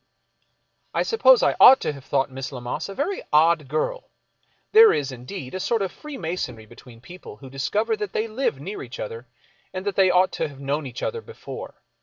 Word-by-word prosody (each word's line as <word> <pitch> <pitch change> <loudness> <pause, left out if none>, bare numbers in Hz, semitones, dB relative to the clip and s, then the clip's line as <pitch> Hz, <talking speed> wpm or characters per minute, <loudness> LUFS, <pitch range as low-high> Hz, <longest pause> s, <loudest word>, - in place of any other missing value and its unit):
I - - +2
suppose - - +5
I - - +3
ought 265 - +9
to - - -2
have 140 -2 -12
thought 135 0 0
Miss 135 +1 -6
Lammas 125 +7 -5
a 195 - -7
very 355 +8 -2
odd 155 -1 +4
girl. 155 - -2 0.6
There 445 +1 +8
is, 140 -2 -1
indeed, 130 +3 -8
a 185 - -3
sort 225 +2 0
of 190 - -3
freemasonry 170 - -6
between 120 +1 -15
people 175 - -12
who 130 +3 -12
discover 210 - -1
that 210 -2 -4
they 220 - -1
live 220 - -2
near 190 +9 -6
each 125 -1 -9
other 115 +3 -6 0.4
and 185 +1 -6
that 200 - -2
they 190 -1 +4
ought 180 +1 +3
to - - -2
have 140 -2 -13
known 140 +1 -2
each 125 0 -8
other 460 - -2
before. 460 0 -10
160 Hz, 200 wpm, -23 LUFS, 135-210 Hz, 0.6 s, ought